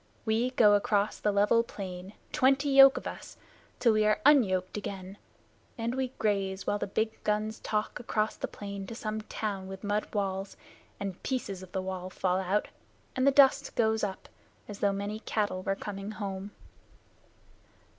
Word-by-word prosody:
We 225 +3 +1
go 220 -5 +5
across 205 0 +1
the 210 - +1
level 205 +3 +4
plain, 190 -3 -7 0.2
twenty 275 +2 +3
yoke 270 0 +8
of - - -6
us, - - -7 0.4
till 230 -3 +4
we 215 0 +3
are 215 0 +3
unyoked 190 -11 +4
again, 195 -1 -6 0.6
and 230 +1 -2
we 265 0 -1
graze 195 -2 -1
while 205 - 0
the - - -2
big 220 +3 -2
guns 215 +1 -1
talk 210 +2 -2
across 220 -3 -1
the - - -4
plain 200 -1 -7
to 230 - -7
some 215 -1 -3
town 205 -3 -4
with 190 +1 -8
mud 205 +1 -1
walls, 195 -1 -2 0.4
and 195 -2 -5
pieces 200 -8 -3
of 185 -1 -11
the 190 -1 -2
wall 185 -1 -4
fall 185 0 0
out, 190 +2 0 0.5
and 255 +1 +2
the - - +7
dust 275 0 +4
goes 220 -1 +2
up 195 -2 -3 0.4
as 205 -1 -8
though 200 - +2
many 200 +2 -3
cattle 210 -4 -1
were 195 +1 -1
coming 195 0 -6
home." 200 -2 -5
205 Hz, 170 wpm, -29 LUFS, 195-220 Hz, 0.6 s, yoke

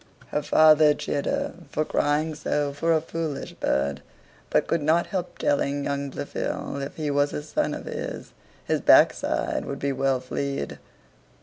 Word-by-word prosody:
Her 150 - -1
father 155 0 +6
chid 140 - -3
her - - -1 0.2
for 155 +2 -1
crying 150 +2 +1
so 145 -1 -1
for 165 +4 0
a 160 -1 +3
foolish 165 -2 -4
bird; 70 +1 -1 0.5
but - - +2
could 165 - 0
not 160 +3 +3
help 180 -3 -4
telling 140 0 0
young 140 0 -2
Blifil, 140 - -4
if 140 - -6
he 150 -2 -2
was 145 0 +1
a 150 - -3
son 150 - -1
of - - -8
his, - - -6 0.3
his - - 0
backside - - +4
should - - -5
be 140 - -1
well 135 -1 +1
flead. 135 - -4
145 Hz, 165 wpm, -25 LUFS, 140-155 Hz, 0.5 s, father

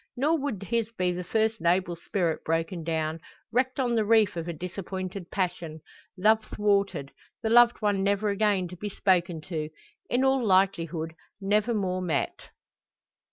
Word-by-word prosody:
Nor 305 +5 +2
would 255 -9 -3
his 230 +1 -1
be 180 -4 0
the 180 +1 -4
first 220 +3 0
noble 175 +1 +2
spirit 170 -1 -2
broken 165 +1 -1
down, 160 0 -2 0.3
wrecked 255 +3 0
on 245 -2 +1
the 225 -2 +2
reef 215 -2 +3
of 170 0 -4
a - - -2
disappointed 185 +2 -6
passion 175 -4 -3 0.4
love 220 +3 +4
thwarted, 200 -11 0 0.3
the 220 - 0
loved 240 -1 +5
one 205 -2 +2
never 200 +2 +1
again 200 -2 +1
to 180 - -8
be 205 +4 -5
spoken 175 -4 +1
to, 155 -2 -4 0.4
in 245 +2 +2
all 265 -1 +3
likelihood 170 -5 +1 0.3
never 210 +4 +1
more 185 -3 -1
met! 160 -6 -2
195 Hz, 160 wpm, -27 LUFS, 170-220 Hz, 0.4 s, loved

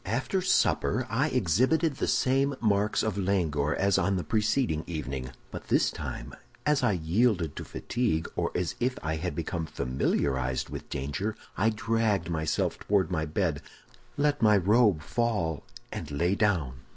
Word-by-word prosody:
"After 130 - 0
supper 130 -7 +2
I 135 +7 +2
exhibited 130 - +2
the - - -1
same 135 +2 +2
marks 105 -1 +2
of 105 -2 -1
languor 80 -7 +1
as 100 0 +2
on 100 - +1
the 90 - -1
preceding 105 - +1
evening; 65 -6 -4 0.2
but - - -8
this - - +3
time, - - -6 0.3
as 150 -1 +3
I 105 - +3
yielded 90 - +1
to - - -4
fatigue, 115 -10 -1
or - - 0
as 90 -2 -1
if 125 +1 0
I 80 0 -1
had 90 +3 -3
become 85 -1 -3
familiarized 65 0 -1
with - - -7
danger, 70 +11 -3 0.2
I 110 +4 +3
dragged 110 -5 0
myself 80 -1 -1
toward 95 -3 +1
my 80 -3 -1
bed, 80 -2 -1 0.6
let 145 0 +1
my 105 -2 +6
robe 100 -3 +3
fall, 100 -7 -1 0.3
and 80 - -5
lay 85 +6 +1
down. 90 - 0
95 Hz, 155 wpm, -28 LUFS, 80-115 Hz, 0.6 s, my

